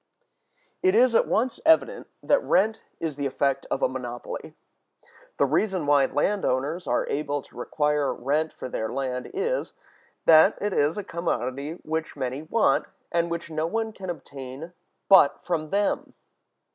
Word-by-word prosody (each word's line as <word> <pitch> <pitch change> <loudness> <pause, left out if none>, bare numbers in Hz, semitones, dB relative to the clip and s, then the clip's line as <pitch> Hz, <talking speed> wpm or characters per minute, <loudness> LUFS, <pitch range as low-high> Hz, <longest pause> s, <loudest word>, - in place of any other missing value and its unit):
It 375 0 +3
is 250 0 +5
at - - +4
once 235 +2 0
evident 325 +10 +3 0.2
that 285 - +3
rent 220 +3 +1
is 155 -4 -3
the 140 -1 -1
effect 135 0 -1
of - - -1
a - - +5
monopoly. - - -6 0.8
The - - +4
reason 190 -7 0
why 145 -2 +4
land 200 +7 0
owners 145 +8 -1
are 125 - +1
able 145 -1 -2
to - - -21
require 150 +3 0
rent 150 +5 -1
for - - -7
their 110 -3 -3
land 130 -2 -3
is, 475 +6 -2 0.5
that 160 +5 +7
it 205 -1 -1
is 145 +3 +1
a 205 - -3
commodity 145 -4 -3
which 160 +1 -3
many 130 +2 -3
want, 160 -2 +2 0.3
and 170 0 +1
which 170 0 -5
no 155 +1 -1
one 220 +4 -2
can 190 -2 -8
obtain 140 0 -8 0.3
but 190 -8 +5
from 160 -3 -2
them. 200 +3 -1
160 Hz, 160 wpm, -25 LUFS, 140-205 Hz, 0.8 s, that